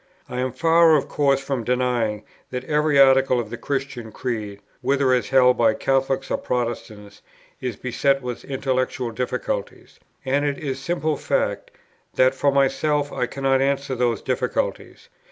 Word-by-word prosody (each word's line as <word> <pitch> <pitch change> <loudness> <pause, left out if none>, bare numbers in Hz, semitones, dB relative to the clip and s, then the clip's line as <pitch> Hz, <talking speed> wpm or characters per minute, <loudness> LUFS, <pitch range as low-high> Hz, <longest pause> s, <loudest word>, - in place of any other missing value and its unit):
I 125 - -5
am 130 0 -1
far 165 +1 +4
of 145 - 0
course 140 -2 +2
from 135 -3 -3
denying 120 -3 0 0.3
that 125 0 -4
every 150 0 +2
article 135 -2 +5
of 115 -2 -5
the 120 - -5
Christian 135 -5 -4
Creed, 105 -4 -4 0.2
whether 135 0 +2
as 125 -4 0
held 125 -1 +4
by 110 -2 +4
Catholics 135 0 0
or - - +1
by - - -14
Protestants, 110 -4 -4 0.4
is 125 -4 -3
beset 135 +3 0
with 125 -1 -5
intellectual 130 -2 -2
difficulties; - - -4 0.3
and 140 +2 +1
it 145 -1 -1
is 135 -3 -4
simple 155 +1 -1
fact, - - -1 0.5
that, 130 +1 +4
for 140 +1 +1
myself, 140 +2 +1
I 125 -2 -1
cannot 135 +1 0
answer 140 0 0
those 120 -3 0
difficulties. - - -3
130 Hz, 155 wpm, -22 LUFS, 125-140 Hz, 0.5 s, article